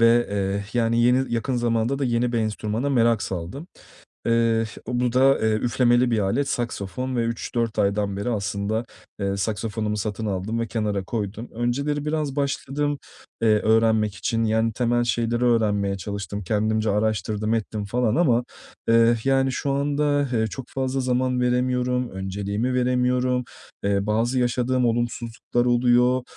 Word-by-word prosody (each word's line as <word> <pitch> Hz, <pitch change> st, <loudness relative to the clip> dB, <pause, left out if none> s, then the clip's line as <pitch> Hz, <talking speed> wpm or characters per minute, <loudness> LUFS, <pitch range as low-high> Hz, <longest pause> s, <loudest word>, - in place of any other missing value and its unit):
ve, 115 Hz, +1 st, +5 dB
eee, 100 Hz, 0 st, -1 dB
yani, 115 Hz, -1 st, +2 dB
yeni, 125 Hz, +1 st, +2 dB
yakın 120 Hz, +2 st, -1 dB
zamanda 120 Hz, +2 st, 0 dB
da 140 Hz, -, 0 dB
yeni 120 Hz, 0 st, 0 dB
bir 120 Hz, -, +1 dB
enstrümana 110 Hz, +4 st, -1 dB
merak 115 Hz, -4 st, +3 dB
saldım. 95 Hz, -, -5 dB, 0.6 s
Eee, 115 Hz, -1 st, +2 dB, 0.2 s
bu 125 Hz, 0 st, 0 dB
da, 135 Hz, +2 st, +4 dB
eee, 110 Hz, 0 st, +2 dB
üflemeli 120 Hz, +2 st, +2 dB
bir 115 Hz, -, +2 dB
alet, 115 Hz, +8 st, 0 dB
saksafon 120 Hz, +1 st, -3 dB
ve 120 Hz, -, +1 dB
3-4 115 Hz, 0 st, -2 dB
aydan 100 Hz, -1 st, +1 dB
beri 100 Hz, +5 st, -2 dB
aslında, 100 Hz, +2 st, -2 dB, 0.4 s
eee, 100 Hz, 0 st, -1 dB
saksafonumu 105 Hz, +1 st, -2 dB
satın 105 Hz, +1 st, -3 dB
aldım 105 Hz, +3 st, -2 dB
ve 115 Hz, -, -1 dB
kenara 105 Hz, -4 st, -1 dB
koydum. 110 Hz, +2 st, -4 dB
Önceleri 140 Hz, +5 st, -1 dB
biraz 150 Hz, -2 st, -2 dB
başladım, 145 Hz, +1 st, -1 dB, 0.4 s
eee, 115 Hz, -, +4 dB
öğrenmek 110 Hz, -1 st, +3 dB
için, 115 Hz, +4 st, -1 dB
yani 110 Hz, +1 st, +1 dB
temel 120 Hz, +1 st, +1 dB
şeyleri 120 Hz, 0 st, 0 dB
öğrenmeye 105 Hz, -4 st, +2 dB
çalıştım. 100 Hz, +1 st, -5 dB
Kendimce 110 Hz, +2 st, +1 dB
araştırdım, 110 Hz, +1 st, 0 dB
ettim 110 Hz, -2 st, -3 dB
falan 120 Hz, +2 st, 0 dB
ama, 125 Hz, -8 st, +3 dB, 0.4 s
eee, 115 Hz, +1 st, +5 dB
yani, 135 Hz, -1 st, +2 dB
şu 140 Hz, +1 st, -1 dB
anda, 145 Hz, 0 st, +1 dB
eee, 110 Hz, -1 st, +2 dB
çok 125 Hz, +4 st, -7 dB
fazla 135 Hz, 0 st, -2 dB
zaman 125 Hz, 0 st, 0 dB
veremiyorum. 125 Hz, 0 st, 0 dB
Önceliğimi 100 Hz, +5 st, -2 dB
veremiyorum. 125 Hz, 0 st, +1 dB, 0.4 s
Eee, 100 Hz, 0 st, +1 dB
bazı 115 Hz, +4 st, +1 dB
yaşadığım 125 Hz, +1 st, +1 dB
olumsuzluklar 120 Hz, 0 st, -1 dB
oluyor. 125 Hz, +1 st, +3 dB
115 Hz, 145 wpm, -24 LUFS, 105-125 Hz, 0.6 s, ve